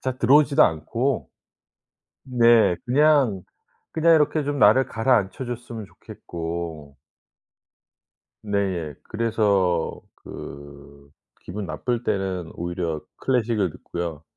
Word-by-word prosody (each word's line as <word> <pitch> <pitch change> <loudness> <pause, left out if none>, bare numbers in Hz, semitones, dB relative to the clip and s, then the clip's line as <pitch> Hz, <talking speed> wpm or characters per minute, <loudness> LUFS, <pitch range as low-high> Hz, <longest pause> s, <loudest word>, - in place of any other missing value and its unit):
잘 130 -1 -3
들어오지도 145 +4 +5
않고 115 - 0 0.9
네 120 -7 +4
그냥, 135 -6 +3 0.5
그냥 165 +1 +4
이렇게 155 -1 +2
좀 145 0 -2
나를 125 +4 +6
가라앉혀 115 0 0
줬으면 120 -3 -6
좋겠고 80 -6 -7 1.4
네예 95 -7 -2
그래서 105 -6 0 0.2
그 70 0 -12 0.3
기분 100 +3 -6
나쁠 120 +7 -3
때는 95 -6 -2
오히려 85 -2 -3 0.2
클래식을 115 -6 0
듣고요. 85 -2 -6
105 Hz, 215 characters per minute, -23 LUFS, 85-125 Hz, 1.4 s, 나를